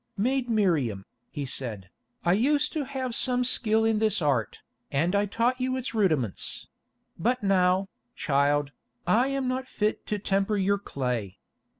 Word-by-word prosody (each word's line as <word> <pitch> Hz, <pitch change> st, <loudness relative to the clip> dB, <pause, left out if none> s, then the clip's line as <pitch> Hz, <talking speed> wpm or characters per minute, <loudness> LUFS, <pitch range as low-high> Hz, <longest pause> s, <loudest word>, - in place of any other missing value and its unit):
"Maid 250 Hz, +4 st, 0 dB
Miriam," 155 Hz, -, +1 dB, 0.2 s
he 145 Hz, -, -4 dB
said, 110 Hz, -8 st, -5 dB, 0.3 s
"I 175 Hz, -, +4 dB
used 285 Hz, +8 st, +2 dB
to 300 Hz, -3 st, -2 dB
have 260 Hz, -2 st, -4 dB
some 250 Hz, +1 st, +1 dB
skill 225 Hz, -3 st, +2 dB
in 220 Hz, -1 st, +2 dB
this 215 Hz, -1 st, +2 dB
art, 140 Hz, -8 st, 0 dB, 0.3 s
and 165 Hz, +7 st, +1 dB
I 205 Hz, +1 st, +2 dB
taught 240 Hz, +5 st, 0 dB
you 255 Hz, 0 st, 0 dB
its 255 Hz, -1 st, -4 dB
rudiments; 155 Hz, -, 0 dB, 0.5 s
but 245 Hz, +6 st, 0 dB
now, 190 Hz, -1 st, +3 dB, 0.3 s
child, 145 Hz, 0 st, +1 dB, 0.3 s
I 225 Hz, +9 st, +3 dB
am 275 Hz, -1 st, -1 dB
not 260 Hz, +1 st, -2 dB
fit 210 Hz, -4 st, -2 dB
to 210 Hz, -, -1 dB
temper 200 Hz, +1 st, 0 dB
your 200 Hz, +1 st, +1 dB
clay. 125 Hz, -, -3 dB
200 Hz, 155 wpm, -27 LUFS, -, 0.5 s, I